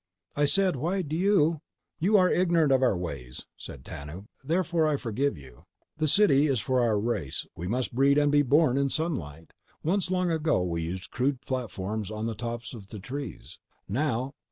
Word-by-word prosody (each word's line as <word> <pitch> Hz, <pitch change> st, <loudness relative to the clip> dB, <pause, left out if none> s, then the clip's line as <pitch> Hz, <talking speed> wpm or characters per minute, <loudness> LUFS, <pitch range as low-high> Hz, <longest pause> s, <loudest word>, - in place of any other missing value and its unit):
"I 145 Hz, -, +3 dB
said: 185 Hz, +1 st, +2 dB
Why 180 Hz, +8 st, -1 dB
do 155 Hz, -1 st, -4 dB
you—" 170 Hz, -4 st, +2 dB, 0.4 s
"You 200 Hz, +6 st, +4 dB
are 185 Hz, -2 st, +5 dB
ignorant 170 Hz, -5 st, +3 dB
of 130 Hz, -1 st, +4 dB
our 125 Hz, -8 st, +3 dB
ways," 70 Hz, -8 st, -6 dB
said 65 Hz, -2 st, -10 dB
Tanub. 75 Hz, +8 st, -8 dB, 0.2 s
"Therefore, 170 Hz, +1 st, +1 dB
I 150 Hz, -2 st, +1 dB
forgive 130 Hz, -, -1 dB
you. 65 Hz, -4 st, -15 dB, 0.3 s
The 155 Hz, 0 st, +1 dB
city 150 Hz, -5 st, +4 dB
is 135 Hz, -5 st, +1 dB
for 130 Hz, +4 st, +1 dB
our 110 Hz, -3 st, +2 dB
race. 105 Hz, -, -2 dB
We 85 Hz, -, -5 dB
must 125 Hz, +5 st, -1 dB
breed 140 Hz, +3 st, +4 dB
and 145 Hz, -1 st, +3 dB
be 145 Hz, 0 st, +5 dB
born 140 Hz, 0 st, +3 dB
in 140 Hz, 0 st, +1 dB
sunlight. 105 Hz, -, -3 dB, 0.3 s
Once—long 180 Hz, 0 st, +1 dB
ago—we 90 Hz, -, 0 dB
used 90 Hz, +3 st, -5 dB
crude 130 Hz, +1 st, 0 dB
platforms 110 Hz, -5 st, -4 dB
on 110 Hz, 0 st, -4 dB
the 115 Hz, -, -2 dB
tops 115 Hz, 0 st, -5 dB
of 105 Hz, -5 st, -10 dB
the 105 Hz, -, -8 dB
trees. 135 Hz, +8 st, -7 dB, 0.3 s
Now 130 Hz, +2 st, -1 dB
135 Hz, 180 wpm, -27 LUFS, 105-155 Hz, 0.4 s, are